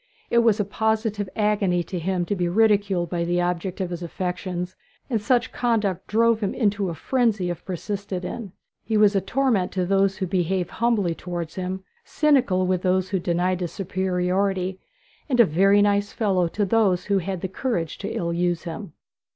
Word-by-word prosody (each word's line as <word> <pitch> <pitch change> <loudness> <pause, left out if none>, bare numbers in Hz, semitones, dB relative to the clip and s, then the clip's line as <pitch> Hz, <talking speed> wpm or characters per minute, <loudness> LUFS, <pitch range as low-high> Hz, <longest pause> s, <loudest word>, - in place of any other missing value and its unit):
It 235 - +5
was 230 -2 +3
a 210 - +1
positive 215 -1 -1
agony 205 -5 +1
to 180 +2 -5
him 180 +1 -1
to 205 - -1
be 175 -2 0
ridiculed 200 -4 +2
by 170 -1 0
the 175 +1 0
object 175 +2 -2
of 185 -2 -2
his 175 0 -4
affections, 180 +1 -4 0.4
and 225 -3 +1
such 245 +3 +1
conduct 220 -7 0
drove 230 +1 +3
him 205 -3 -2
into 205 -5 +1
a 170 - -4
frenzy 215 - +1
if 175 0 -7
persisted 190 0 -4
in. 215 -3 -6 0.3
He 220 0 0
was 210 -1 +5
a 195 - +3
torment 225 -2 +1
to 185 -1 0
those 195 +1 +2
who 190 - -1
behaved 185 0 -1
humbly 220 -7 +1
towards 170 -1 -5
him, 185 0 -4 0.2
cynical 255 -12 +2
with 185 -1 0
those 185 0 +1
who 195 - 0
denied 175 +1 0
his 175 -3 -4
superiority, 190 0 -1 0.5
and 250 -3 +1
a 235 - +9
very 195 +5 +4
nice 205 0 +1
fellow 190 -5 +1
towards 200 +3 -2
those 200 -6 +3
who 200 -1 +2
had 185 0 -4
the - - -2
courage 185 -5 -3
to - - -4
ill 170 0 -2
use 175 -1 0
him. 170 0 -7
190 Hz, 185 wpm, -24 LUFS, 180-210 Hz, 0.5 s, a